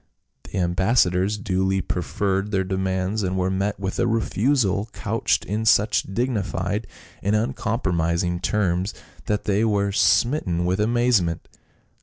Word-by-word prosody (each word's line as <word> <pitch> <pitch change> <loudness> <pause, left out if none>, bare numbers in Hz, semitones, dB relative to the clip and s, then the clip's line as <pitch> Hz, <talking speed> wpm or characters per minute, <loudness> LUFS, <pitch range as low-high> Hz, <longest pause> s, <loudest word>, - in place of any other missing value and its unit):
The - - -6
ambassadors 95 +2 +2
duly 95 -1 0
preferred 95 +2 -1
their 95 -2 0
de 95 +1 -3
mands, 95 +2 -1
and 95 -1 -1
were 95 0 0
met 100 +2 -1
with 95 -1 -3
a - - +2
refusal 115 -2 +1
couched - - 0
in 105 +3 -2
such 110 -2 +4
dignified 105 -2 -2 0.3
and 100 +2 +1
uncompromising 90 -6 0
terms 95 -1 0 0.3
that 105 -1 0
they 105 +1 +1
were 100 -2 +1
smitten 95 - +2
with 90 +3 0
amazement. 110 -6 +1
100 Hz, 130 wpm, -23 LUFS, 95-110 Hz, 0.3 s, such